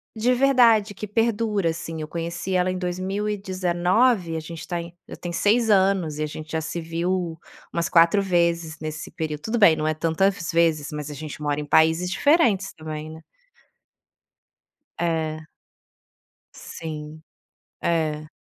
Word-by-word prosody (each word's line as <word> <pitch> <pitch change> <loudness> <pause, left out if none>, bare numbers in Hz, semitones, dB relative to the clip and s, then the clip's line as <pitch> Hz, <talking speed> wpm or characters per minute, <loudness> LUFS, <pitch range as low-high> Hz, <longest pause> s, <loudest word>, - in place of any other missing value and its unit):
De 235 +3 +2
verdade, 240 -6 +4
que 210 - -6
perdura, 210 -3 +1
assim. 165 -1 -5
Eu 155 - -5
conheci 170 +3 -4
ela 180 0 +2
em 185 - -3
2019, 185 +1 0
a - - -1
gente 160 +1 -8
tá 175 -2 -2
em 170 0 -9 0.2
já - - -8
tem 175 - -6
6 220 +6 +2
anos, 190 -6 +3
e 155 - -1
a - - 0
gente 155 +1 -8
já 160 0 -1
se 165 +2 -4
viu 170 +1 -2 0.3
umas 170 0 -1
4 170 +3 +5
vezes 170 -4 0
nesse 155 0 -6
período. 155 -2 -4
Tudo 225 +7 -2
bem, 175 -7 +7
não 155 0 -2
é 155 - +2
tantas 165 +3 0
vezes, 165 -3 +2
mas 150 0 -5
a - - -6
gente 150 +1 -7
mora 145 -1 -1
em 150 - -4
países 160 +4 +3
diferentes 225 - +2
também, 155 0 -7
né? 160 - -11 1.8
É. 160 -2 -2 1.1
Sim. 155 -1 -8 0.6
É. 155 -2 0
170 Hz, 155 wpm, -24 LUFS, 155-195 Hz, 1.8 s, bem